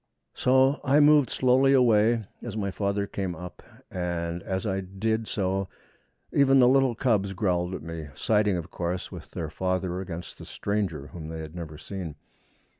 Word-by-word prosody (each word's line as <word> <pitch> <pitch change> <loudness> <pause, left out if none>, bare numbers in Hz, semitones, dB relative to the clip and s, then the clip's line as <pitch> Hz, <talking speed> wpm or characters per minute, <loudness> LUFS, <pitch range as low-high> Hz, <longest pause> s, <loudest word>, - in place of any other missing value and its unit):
So 130 +2 +3
I 140 +3 +4
moved 150 -2 +6
slowly 130 +2 +4
away 115 -3 +4 0.2
as 110 -3 -6
my 100 -2 -1
father 100 +1 -1
came 95 -3 -4
up, 90 +2 -9 0.3
and 85 -1 -3
as 95 +2 -3
I 95 -2 0
did 110 +4 -2
so 95 -1 -1 0.7
even 135 -1 +5
the 125 -2 +7
little 135 -2 +4
cubs 105 -5 +1
growled 90 -2 0
at - - -7
me, 80 -1 -6
siding, 105 -3 +2
of 85 - -6
course, 90 +1 -3
with - - -9
their 80 -2 -5
father 90 0 -1
against 85 -2 -7
the - - -9
stranger 100 -9 -2
whom 80 +1 -8
they 80 - -5
had 80 0 -8
never 80 -3 -7
seen. 90 -3 -6
95 Hz, 170 wpm, -27 LUFS, 90-115 Hz, 0.7 s, the